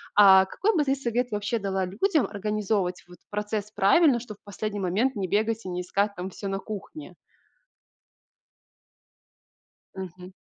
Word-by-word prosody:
а, 190 Hz, -2 st, +8 dB
какой 410 Hz, -, 0 dB
бы 310 Hz, -, +3 dB
ты 275 Hz, -1 st, +1 dB
совет 245 Hz, -2 st, -1 dB
вообще 210 Hz, +3 st, -1 dB
дала 195 Hz, -1 st, -1 dB
людям 275 Hz, -, +1 dB
организовывать 205 Hz, -2 st, -2 dB
вот 175 Hz, -, -14 dB
процесс 210 Hz, 0 st, -3 dB
правильно, 245 Hz, -, +4 dB
чтоб 220 Hz, -4 st, -9 dB
в -, -, -57 dB
последний 205 Hz, 0 st, -4 dB
момент 210 Hz, +9 st, +1 dB
не 195 Hz, -2 st, -2 dB
бегать 220 Hz, +3 st, 0 dB
и -, -, -4 dB
не 180 Hz, 0 st, -3 dB
искать 200 Hz, +3 st, -1 dB
там 180 Hz, +2 st, -5 dB
всё 200 Hz, -, -6 dB
на 195 Hz, 0 st, -2 dB
кухне? 215 Hz, +10 st, -8 dB, 2.8 s
Мгм. 185 Hz, 0 st, -8 dB
205 Hz, 150 wpm, -26 LUFS, 190-230 Hz, 2.8 s, а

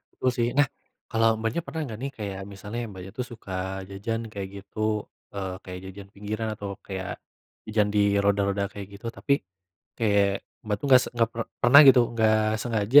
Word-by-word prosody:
Betul, 130 Hz, -, +1 dB
sih. 120 Hz, -1 st, +2 dB
Nah, 145 Hz, -1 st, +6 dB, 0.4 s
kalau 115 Hz, 0 st, +3 dB
Mbaknya 115 Hz, +8 st, -1 dB
pernah 155 Hz, +4 st, -4 dB
nggak, 110 Hz, -4 st, -7 dB
nih, 135 Hz, +1 st, -3 dB
kayak 100 Hz, -3 st, -5 dB
misalnya 100 Hz, +3 st, -6 dB
Mbaknya, 95 Hz, -1 st, -9 dB
tuh, 125 Hz, -, -2 dB
suka 95 Hz, -4 st, -5 dB
jajan, 115 Hz, +3 st, -4 dB
kayak 100 Hz, -2 st, -4 dB
gitu, 110 Hz, +1 st, -1 dB, 0.3 s
eee, 95 Hz, -2 st, -3 dB
kayak 90 Hz, -1 st, -7 dB
jajan 100 Hz, +1 st, -11 dB
pinggiran 105 Hz, +2 st, -3 dB
atau 100 Hz, -1 st, -6 dB
kayak 95 Hz, -2 st, -5 dB, 0.5 s
jajan 105 Hz, -1 st, +2 dB
di 100 Hz, -1 st, +4 dB
roda-roda 100 Hz, 0 st, +1 dB
kayak 100 Hz, -1 st, -7 dB
gitu, 115 Hz, -, -9 dB
tapi 140 Hz, +4 st, 0 dB, 0.6 s
kayak 100 Hz, -3 st, +2 dB, 0.2 s
Mbak, 105 Hz, -1 st, 0 dB
tuh, -, -, -1 dB
nggak 130 Hz, -1 st, +9 dB
se -, -, -4 dB
nggak 115 Hz, -1 st, +3 dB
per 115 Hz, -, -2 dB, 0.2 s
pernah, 135 Hz, +4 st, +9 dB
gitu, 130 Hz, -2 st, +9 dB
nggak 110 Hz, -1 st, +4 dB, 0.3 s
sengaja 115 Hz, +3 st, +5 dB
105 Hz, 180 wpm, -26 LUFS, 100-115 Hz, 0.6 s, nggak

